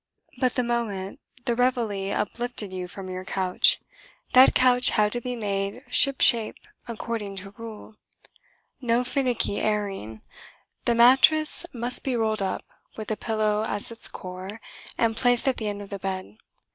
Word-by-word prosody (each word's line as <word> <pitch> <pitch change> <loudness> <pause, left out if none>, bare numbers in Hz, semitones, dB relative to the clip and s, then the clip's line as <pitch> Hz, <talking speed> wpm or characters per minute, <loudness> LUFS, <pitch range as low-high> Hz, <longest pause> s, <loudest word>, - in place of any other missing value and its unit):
But 255 -2 +1
the 250 - +1
moment 220 -5 -3 0.3
the 240 - +1
Réveillé 230 -6 0
uplifted 225 -2 -3
you 180 -1 -5
from 190 +1 -9
your 185 0 -6
couch, 185 -1 +2 0.6
that 255 +1 +7
couch 250 -1 +5
had 210 -1 +2
to 240 - -3
be 250 +1 -4
made 200 +1 -3
ship 275 -1 +5
shape 230 -4 +5 0.3
according 225 -3 -5
to 195 +1 -7
rule. 220 0 -10 0.9
No 240 0 +1
finicky 250 -5 -1
"airing"! 195 - -3 0.6
The 235 - +2
mattress 270 +8 +5
must 245 +1 -1
be 260 -2 -1
rolled 220 -2 0
up, 190 -1 -3 0.3
with 215 -1 -6
the 215 - 0
pillow 215 -1 -1
as 205 0 -4
its 230 - +5
core, 185 +4 -8 0.4
and 225 -1 +1
placed 245 +3 +2
at 265 - +1
the 215 - -3
end 205 0 -4
of 200 - -14
the 200 - -5
bed. 185 - -5
220 Hz, 160 wpm, -25 LUFS, 195-245 Hz, 0.9 s, that